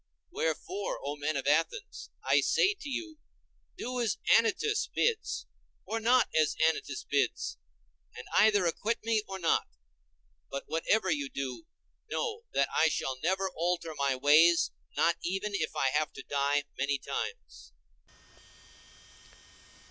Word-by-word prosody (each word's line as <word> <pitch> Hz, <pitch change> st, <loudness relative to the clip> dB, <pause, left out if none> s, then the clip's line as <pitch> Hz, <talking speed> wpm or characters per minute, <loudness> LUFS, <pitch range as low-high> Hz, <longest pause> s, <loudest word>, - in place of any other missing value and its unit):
Wherefore, 410 Hz, -2 st, -2 dB
O 145 Hz, +1 st, -3 dB
men 145 Hz, 0 st, -2 dB
of 135 Hz, -, -3 dB
Athens, 165 Hz, -, 0 dB
I -, -, +4 dB
say 395 Hz, -, +3 dB
to 295 Hz, -8 st, -9 dB
you, 315 Hz, +3 st, -5 dB, 0.6 s
do 250 Hz, 0 st, -3 dB
as 225 Hz, -4 st, 0 dB, 0.2 s
Anytus 415 Hz, -, +2 dB
bids 460 Hz, -2 st, -1 dB, 0.4 s
or 225 Hz, -, -2 dB
not 245 Hz, +3 st, +4 dB
as 155 Hz, -1 st, +3 dB
Anytus 160 Hz, -3 st, 0 dB
bids, 140 Hz, -, -1 dB, 0.6 s
and -, -, -8 dB
either 205 Hz, -2 st, +5 dB
acquit 215 Hz, +8 st, -1 dB
me 225 Hz, -1 st, +2 dB
or 195 Hz, -, -5 dB
not; 170 Hz, -3 st, +1 dB, 0.8 s
but 140 Hz, -, -4 dB
whatever 190 Hz, +4 st, +1 dB
you 145 Hz, -3 st, -1 dB
do, 135 Hz, -, -5 dB, 0.4 s
know 460 Hz, 0 st, -3 dB
that -, -, +2 dB
I 160 Hz, -, +4 dB
shall 130 Hz, -3 st, -2 dB
never 190 Hz, +2 st, 0 dB
alter 170 Hz, -1 st, -1 dB
my 140 Hz, -2 st, 0 dB
ways, 155 Hz, +6 st, +5 dB, 0.3 s
not 170 Hz, 0 st, +3 dB
even 195 Hz, +4 st, -2 dB
if 175 Hz, -6 st, -2 dB
I 135 Hz, -, +2 dB
have 150 Hz, +3 st, 0 dB
to -, -, -9 dB
die 140 Hz, +1 st, +1 dB
many 140 Hz, +2 st, 0 dB
times. 470 Hz, -, -6 dB
175 Hz, 135 wpm, -30 LUFS, 145-235 Hz, 0.8 s, either